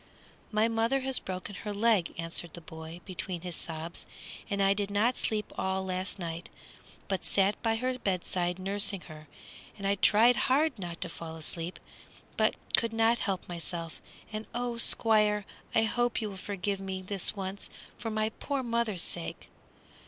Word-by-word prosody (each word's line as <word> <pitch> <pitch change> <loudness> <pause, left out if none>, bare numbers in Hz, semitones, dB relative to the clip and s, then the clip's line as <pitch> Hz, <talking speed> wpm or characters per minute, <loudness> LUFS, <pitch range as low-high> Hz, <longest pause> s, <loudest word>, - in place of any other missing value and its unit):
"My 215 +1 +4
mother 230 +4 +2
has 265 0 +1
broken 185 +2 -5
her 210 - -4
leg," 215 -4 +3
answered 165 0 -4
the - - -7
boy, 160 +1 -9
between 180 -1 -4
his 180 -2 -4
sobs, 165 +2 -5 0.4
"and 200 - 0
I 195 0 +5
did 200 0 -1
not 215 +5 +3
sleep 215 -2 -1
all 190 0 0
last 185 +1 -2
night, 170 -2 -4 0.6
but 190 -2 -1
sat 200 +1 +2
by 225 -1 +2
her 255 +2 -1
bedside 180 -3 0
nursing 195 0 0
her. 155 -2 -11 0.5
And 200 - -5
I 200 - +4
tried 220 +4 +6
hard 285 -2 +3
not 175 -2 -5
to 180 - 0
fall 165 -1 -7
asleep, 165 +2 -5 0.6
but - - +3 0.2
could 230 -1 +1
not 225 +1 +4
help 190 -3 -1
myself; 170 -1 -5 0.3
and 215 +1 -4
oh, 240 -1 -1
Squire! 210 -3 +4 0.3
I 225 - +6
hope 240 +2 +1
you 215 -2 -2
will - - -7
forgive 200 0 -2
me 190 -1 -4
this 195 +1 -1
once, 195 0 -4 0.3
for 225 - -4
my 215 0 +1
poor 275 +4 -2
mother's 230 -6 +1
sake!" 170 - -4
200 Hz, 165 wpm, -31 LUFS, 180-225 Hz, 0.6 s, tried